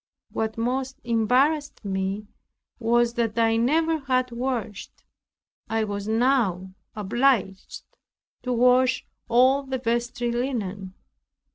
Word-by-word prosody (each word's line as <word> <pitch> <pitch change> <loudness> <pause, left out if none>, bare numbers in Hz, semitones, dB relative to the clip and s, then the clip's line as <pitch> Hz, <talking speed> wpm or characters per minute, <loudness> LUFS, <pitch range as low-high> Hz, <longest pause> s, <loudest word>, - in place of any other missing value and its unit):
What 220 0 -3
most 260 +3 -2
embarrassed 250 +5 +1
me 195 +1 -2 0.5
was 235 0 +2
that 230 -2 -1
I 225 -1 +3
never 320 +7 +2
had 255 -2 0
washed. 235 -4 -4 0.7
I 225 0 0
was 205 -1 -4
now 220 -6 +1 0.2
obliged 210 -2 0 0.6
to 250 - -3
wash 250 +1 +3 0.2
all 255 +4 +4
the 265 -1 -4
vestry 240 0 -1
linen. 205 -7 -3
235 Hz, 105 wpm, -25 LUFS, 215-255 Hz, 0.7 s, all